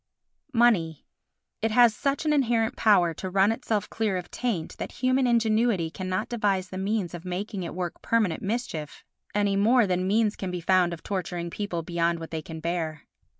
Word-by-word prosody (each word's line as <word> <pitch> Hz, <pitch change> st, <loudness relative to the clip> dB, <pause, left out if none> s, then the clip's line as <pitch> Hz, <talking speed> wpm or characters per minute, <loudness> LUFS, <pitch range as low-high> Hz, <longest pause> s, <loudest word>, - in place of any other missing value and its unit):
Money 190 Hz, -10 st, +3 dB, 0.6 s
It 225 Hz, -, +1 dB
has 235 Hz, 0 st, +5 dB
such 280 Hz, +4 st, -1 dB
an 305 Hz, -, +3 dB
inherent 235 Hz, -5 st, +1 dB
power 180 Hz, -6 st, +4 dB
to 185 Hz, -, -5 dB
run 195 Hz, +3 st, +3 dB
itself 220 Hz, -2 st, -1 dB
clear 215 Hz, -4 st, -1 dB
of 180 Hz, -, -7 dB
taint 220 Hz, -10 st, -2 dB
that -, -, -5 dB
human 255 Hz, +1 st, +2 dB
ingenuity 220 Hz, -6 st, +2 dB
cannot 185 Hz, +5 st, -3 dB
devise 200 Hz, -6 st, 0 dB
the 185 Hz, -, -5 dB
means 195 Hz, -3 st, -1 dB
of 175 Hz, -1 st, -7 dB
making 190 Hz, +2 st, -4 dB
it 170 Hz, -, -5 dB
work 180 Hz, -2 st, -4 dB
permanent 215 Hz, -8 st, +1 dB
mischief, 195 Hz, -8 st, -4 dB, 0.3 s
any 205 Hz, -1 st, +2 dB
more 230 Hz, +4 st, +4 dB
than 185 Hz, -1 st, 0 dB
means 215 Hz, +1 st, +2 dB
can 190 Hz, -, -4 dB
be 180 Hz, 0 st, -3 dB
found 180 Hz, 0 st, +3 dB
of 170 Hz, -, -7 dB
torturing 175 Hz, -3 st, -3 dB
people 180 Hz, -5 st, -3 dB
beyond 170 Hz, 0 st, 0 dB
what 165 Hz, -, -8 dB
they 160 Hz, -1 st, -3 dB
can 160 Hz, +1 st, -8 dB
bear. 160 Hz, -2 st, -3 dB
195 Hz, 185 wpm, -26 LUFS, 175-225 Hz, 0.6 s, has